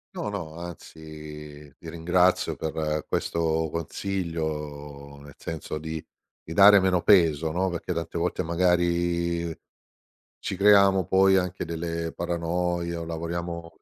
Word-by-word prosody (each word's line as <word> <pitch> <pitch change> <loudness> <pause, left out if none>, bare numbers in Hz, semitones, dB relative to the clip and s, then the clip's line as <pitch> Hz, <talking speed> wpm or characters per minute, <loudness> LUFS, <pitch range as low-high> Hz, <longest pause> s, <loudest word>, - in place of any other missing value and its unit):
No, 105 - -3
no, 90 -6 -5
anzi 75 -4 -10
ti 85 - -10
ringrazio 90 +2 +2
per 75 -1 -2
questo 80 -1 0
consiglio, 75 -6 -4
nel 70 -1 -13
senso 80 -1 -5
di 80 0 -5 0.4
di 80 - -8
dare 100 +1 +8
meno 95 -2 +2
peso, 80 -5 +4
no? 95 +3 0
Perché 85 +1 -4
tante 85 0 -3
volte 90 +1 -1
magari, 85 -1 +1 0.9
ci - - -4
creiamo 100 -2 +5
poi 95 0 +5
anche 90 -1 -1
delle 85 0 -4
paranoie 85 0 -2
o 85 - -4
lavoriamo 85 0 -5
85 Hz, 120 wpm, -26 LUFS, 80-90 Hz, 0.9 s, dare